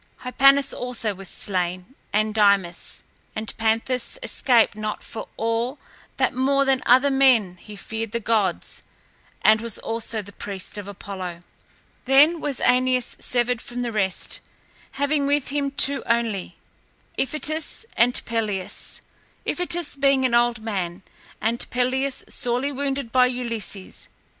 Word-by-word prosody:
Hypanis 275 +2 +4
also 240 -4 -2
was 195 -1 -7
slain 185 +2 -2 0.2
and 215 +1 +1
Dymas, 200 -5 +1 0.3
and 220 0 -4
Panthus 225 - 0
escaped 235 - +3
not 215 0 -4
for 220 - -7
all 230 +4 -1 0.4
that - - +2
more 275 +2 +2
than 270 -1 +2
other 260 +3 +5
men 250 -9 +4
he 210 +4 -11
feared 225 +1 -5
the 235 - -1
gods 210 -5 0 0.6
and 220 0 +6
was 230 -2 0
also 225 -1 -2
the 200 - -12
priest 200 +1 -6
of 200 - -8
Apollo. 185 -3 -7 0.6
Then 295 +6 +5
was 280 -4 -2
Æneas 255 0 +2
severed 245 -1 0
from 245 0 -5
the 240 - -2
rest, 195 -4 -1 0.5
having 285 0 +1
with 285 -1 +1
him 280 0 0
two 280 0 +3
only, 230 -5 0 0.6
Iphitus 310 +7 -2
and 245 +1 +4
Pelias, 215 -5 -3 0.4
Iphitus 345 -4 -1
being 275 -1 +3
an 250 - +1
old 235 -2 +2
man 190 -4 -3 0.4
and 225 +2 0
Pelias 260 +2 0
sorely 250 +2 -1
wounded 275 -3 -2
by 255 -1 +5
Ulysses. 230 -6 -4
235 Hz, 135 wpm, -23 LUFS, 210-270 Hz, 0.6 s, and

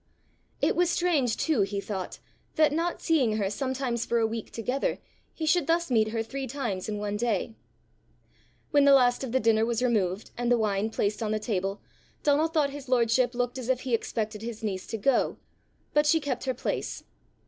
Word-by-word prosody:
It - - +3
was 355 -1 +3
strange, 310 -11 +1
too, 310 -9 +1
he 200 +1 -1
thought, 195 -2 -5 0.4
that, 310 -2 +4
not 335 +3 -1
seeing 260 -10 +2
her 200 -2 0
sometimes 260 -1 -2
for 235 - 0
a 225 - +3
week 225 0 -4
together, 250 +4 -2 0.3
he 320 - -4
should 340 +3 +2
thus 335 -2 +1
meet 220 -2 +4
her 225 +1 -2
three 265 +3 -5
times 230 -8 -3
in 210 - -2
one 205 0 -2
day. 225 -1 -1 1.2
When 285 -1 +5
the 280 - +7
last 245 -1 +3
of 260 - -4
the 260 - +2
dinner 220 -1 +3
was 235 +1 0
removed 210 -5 0
and 240 0 -1
the 245 - +5
wine 210 -1 0
placed 210 -1 -1
on 220 - -1
the 215 - 0
table, 195 -2 -2 0.4
Donal 295 +2 +3
thought 310 -4 +1
his 280 -2 -9
lordship 245 0 +2
looked 245 +1 -1
as 250 -1 -6
if 255 -1 +1
he 255 -2 -3
expected 215 -1 -2
his 225 -1 -6
niece 190 -3 -3
to 225 - -3
go; 260 +5 +1 0.6
but 295 0 +3
she 320 +2 +4
kept 285 -4 -3
her 260 -1 -1
place. - - -3
240 Hz, 200 wpm, -27 LUFS, 215-275 Hz, 1.2 s, the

